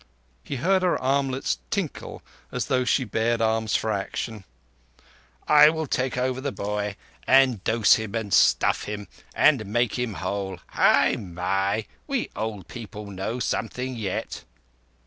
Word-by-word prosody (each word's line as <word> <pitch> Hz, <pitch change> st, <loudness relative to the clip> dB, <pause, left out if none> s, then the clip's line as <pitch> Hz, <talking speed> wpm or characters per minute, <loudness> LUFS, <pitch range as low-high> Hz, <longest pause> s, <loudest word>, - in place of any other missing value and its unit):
He -, -, -5 dB
heard 185 Hz, +8 st, +2 dB
her 180 Hz, -1 st, +1 dB
armlets 135 Hz, -, 0 dB
tinkle -, -, -4 dB, 0.3 s
as -, -, -2 dB
though 125 Hz, -1 st, +1 dB
she 130 Hz, -, +2 dB
bared 115 Hz, +1 st, 0 dB
arms 110 Hz, -1 st, +1 dB
for 110 Hz, -, 0 dB
action. 105 Hz, +1 st, -4 dB, 1.0 s
"I 150 Hz, 0 st, +8 dB
will 160 Hz, 0 st, -2 dB
take 130 Hz, -2 st, -1 dB
over 130 Hz, +1 st, -1 dB
the 140 Hz, 0 st, -2 dB
boy 105 Hz, -1 st, -3 dB, 0.3 s
and 130 Hz, -7 st, +4 dB
dose 115 Hz, -2 st, +4 dB
him, 110 Hz, 0 st, -5 dB
and 110 Hz, -3 st, -3 dB
stuff -, -, +4 dB
him, 105 Hz, -1 st, -6 dB, 0.3 s
and 140 Hz, -7 st, +4 dB
make 120 Hz, +3 st, 0 dB
him 120 Hz, -5 st, -2 dB
all -, -, -7 dB
whole. 95 Hz, 0 st, -3 dB
Hai! -, -, +3 dB, 0.2 s
hai! 100 Hz, +4 st, 0 dB, 0.2 s
We 275 Hz, -5 st, -2 dB
old 105 Hz, -5 st, -4 dB
people 105 Hz, -3 st, -8 dB
know 100 Hz, +6 st, -4 dB
something 125 Hz, +2 st, -2 dB
yet." 105 Hz, -5 st, -4 dB
115 Hz, 145 wpm, -25 LUFS, 105-130 Hz, 1.0 s, I